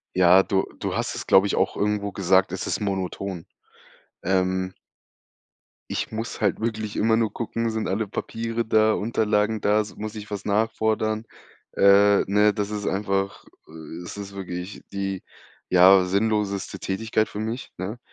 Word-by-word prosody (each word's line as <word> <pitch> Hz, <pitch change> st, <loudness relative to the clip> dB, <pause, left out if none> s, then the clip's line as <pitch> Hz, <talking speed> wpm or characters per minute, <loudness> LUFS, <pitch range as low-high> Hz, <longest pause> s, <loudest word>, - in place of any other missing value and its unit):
Ja, 95 Hz, +1 st, +6 dB
du 95 Hz, -1 st, 0 dB
du -, -, -3 dB
hast -, -, -2 dB
es, -, -, -6 dB
glaube 95 Hz, +1 st, +6 dB
ich, -, -, -1 dB
auch -, -, +1 dB
irgendwo 105 Hz, -1 st, 0 dB
gesagt: 95 Hz, -1 st, +2 dB
„Es 95 Hz, -, -4 dB
ist -, -, -1 dB
monoton.“ 95 Hz, -2 st, -3 dB, 0.8 s
Ähm. 95 Hz, 0 st, 0 dB, 1.2 s
Ich -, -, -2 dB
muss 110 Hz, +1 st, -5 dB
halt 100 Hz, -3 st, +1 dB
wirklich 110 Hz, -2 st, -3 dB
immer 110 Hz, +1 st, +3 dB
nur 115 Hz, -2 st, +1 dB
gucken, 115 Hz, 0 st, -2 dB
sind 110 Hz, 0 st, -2 dB
alle 105 Hz, +3 st, -1 dB
Papiere 115 Hz, +3 st, -3 dB
da, 110 Hz, -1 st, +3 dB
Unterlagen 105 Hz, 0 st, 0 dB
da, 105 Hz, +1 st, +3 dB
s 105 Hz, -, -6 dB
muss 110 Hz, +1 st, -6 dB
ich 105 Hz, -1 st, -8 dB
was 105 Hz, -1 st, -5 dB
nachfordern, 110 Hz, +1 st, 0 dB, 0.5 s
äh, 100 Hz, +1 st, +6 dB
ne? 105 Hz, +1 st, +4 dB
Das 105 Hz, -1 st, -2 dB
ist 105 Hz, -1 st, -3 dB
einfach, 100 Hz, 0 st, -1 dB, 0.2 s
äh, 80 Hz, +1 st, -9 dB
es 85 Hz, -, -8 dB
ist 100 Hz, -1 st, -7 dB
wirklich 90 Hz, 0 st, -6 dB
die, 95 Hz, -1 st, -3 dB, 0.5 s
ja, 95 Hz, +1 st, +7 dB
sinnloseste 100 Hz, +1 st, -1 dB
Tätigkeit 110 Hz, +2 st, -1 dB
für 105 Hz, -, -6 dB
mich, 110 Hz, +3 st, -4 dB
ne? 100 Hz, +6 st, -4 dB
100 Hz, 160 wpm, -24 LUFS, 95-110 Hz, 1.2 s, ja